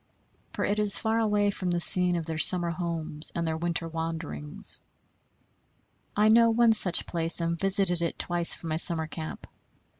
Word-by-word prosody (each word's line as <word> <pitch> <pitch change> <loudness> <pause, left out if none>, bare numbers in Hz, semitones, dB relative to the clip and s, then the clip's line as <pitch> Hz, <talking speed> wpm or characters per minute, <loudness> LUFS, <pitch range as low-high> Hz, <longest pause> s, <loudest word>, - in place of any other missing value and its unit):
For - - -3
it 205 +1 -2
is 210 -2 +4
far 225 0 -1
away 205 -2 0
from 185 -2 -5
the 175 0 -1
scene 180 +1 +6
of 165 -2 -4
their 160 -1 -5
summer 175 0 +3
homes 165 -3 -6
and 170 -1 -3
their 160 0 -3
winter 170 0 -4
wanderings. 160 - -2 1.4
I 210 +1 +2
know 230 +1 +4
one 230 0 +2
such 190 -5 +3
place, 165 0 +1
and 170 0 -2
visited 190 -2 0
it 170 - -3
twice 175 -1 -1
from 165 - -9
my 155 - -2
summer 165 -1 0
camp. 155 0 -9
170 Hz, 175 wpm, -26 LUFS, 165-200 Hz, 1.4 s, scene